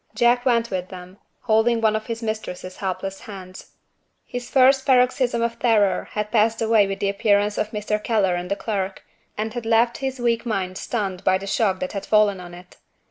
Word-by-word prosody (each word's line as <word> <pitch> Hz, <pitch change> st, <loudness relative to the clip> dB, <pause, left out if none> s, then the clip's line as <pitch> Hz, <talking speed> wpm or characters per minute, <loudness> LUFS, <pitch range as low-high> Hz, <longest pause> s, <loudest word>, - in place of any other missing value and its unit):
Jack 240 Hz, +2 st, +3 dB
went 235 Hz, -1 st, +2 dB
with 185 Hz, -1 st, -3 dB
them, 185 Hz, +1 st, -11 dB, 0.2 s
holding 230 Hz, 0 st, +2 dB
one 220 Hz, -1 st, +2 dB
of 215 Hz, +2 st, -4 dB
his 230 Hz, 0 st, -5 dB
mistress's 200 Hz, -4 st, -5 dB
helpless 195 Hz, 0 st, -4 dB
hands. 185 Hz, -3 st, -11 dB, 0.5 s
His 245 Hz, -1 st, -6 dB
first 265 Hz, 0 st, +5 dB
paroxysm 250 Hz, -2 st, +2 dB
of 235 Hz, 0 st, -2 dB
terror 215 Hz, -5 st, +2 dB
had 210 Hz, 0 st, -3 dB
passed 225 Hz, 0 st, +2 dB
away 220 Hz, -3 st, +3 dB
with 195 Hz, 0 st, -4 dB
the 200 Hz, -, +1 dB
appearance 205 Hz, +1 st, +2 dB
of 210 Hz, -, -1 dB
Mr. 210 Hz, 0 st, -3 dB
Keller 205 Hz, -5 st, +1 dB
and 175 Hz, 0 st, -4 dB
the 200 Hz, -, 0 dB
clerk, 195 Hz, -2 st, -3 dB, 0.3 s
and 215 Hz, +1 st, -3 dB
had 240 Hz, -, -4 dB
left 230 Hz, +1 st, +2 dB
his 265 Hz, -1 st, -3 dB
weak 235 Hz, -1 st, +1 dB
mind 190 Hz, -5 st, -3 dB
stunned 195 Hz, -6 st, -3 dB
by 190 Hz, -, +3 dB
the 195 Hz, -, -8 dB
shock 195 Hz, -2 st, 0 dB
that 185 Hz, -, -3 dB
had 195 Hz, -, -5 dB
fallen 210 Hz, -3 st, +3 dB
on 175 Hz, -1 st, -10 dB
it. 180 Hz, 0 st, -15 dB
215 Hz, 195 wpm, -22 LUFS, 195-235 Hz, 0.5 s, first